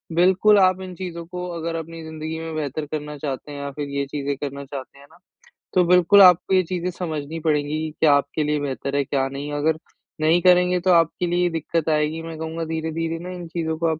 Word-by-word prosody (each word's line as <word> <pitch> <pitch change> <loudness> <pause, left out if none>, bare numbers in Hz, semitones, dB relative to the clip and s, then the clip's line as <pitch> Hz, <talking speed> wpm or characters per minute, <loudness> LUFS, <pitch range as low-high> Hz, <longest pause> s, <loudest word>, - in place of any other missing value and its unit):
बिल्कुल, 190 +4 +5
आप 185 -1 +4
इन 185 -1 -7
चीजों 170 -2 -6
को 180 +1 -6
अगर 165 0 -3
अपनी 165 0 -6
जिंदगी 160 0 -6
में 165 -1 -5
बेहतर 150 0 -3
करना 150 -1 -4
चाहते 140 0 -5
हैं 145 - -7
या 140 0 -4
फिर 145 +1 -5
ये 140 0 -2
चीज़ें 140 -1 -2
करना 140 -1 -5
चाहते 135 -1 -8
हैं 140 - -15
ना 160 - -20 0.6
तो 180 - +5
बिल्कुल 180 +3 +6
आपको 180 0 +6
ये 185 - +5
चीज़ें 180 +1 -3
समझनी 160 -3 -4
पड़ेगी, 155 0 0
क्या 155 -2 +5
आपके 140 +2 +1
लिए 150 0 0
बेहतर 140 0 -3
है, 140 - +2
क्या 135 0 0
नहीं। 140 +2 -6
अगर 155 +2 +1 0.4
नहीं 160 +3 +4
करेंगे 180 0 +4
तो 185 +1 +2
आपके 170 +1 +2
लिए 175 +1 +1
दिक्कत 165 0 -2
आएगी। 155 +1 0
मैं 165 -1 -7
कहूँगा 160 +1 -4
धीरे-धीरे 160 +1 -3
ना 175 +2 -7
इन 175 -1 -7
चीज़ों 160 -1 -3
को 165 +1 0
आप 160 -1 -1
160 Hz, 220 wpm, -23 LUFS, 150-175 Hz, 0.6 s, बिल्कुल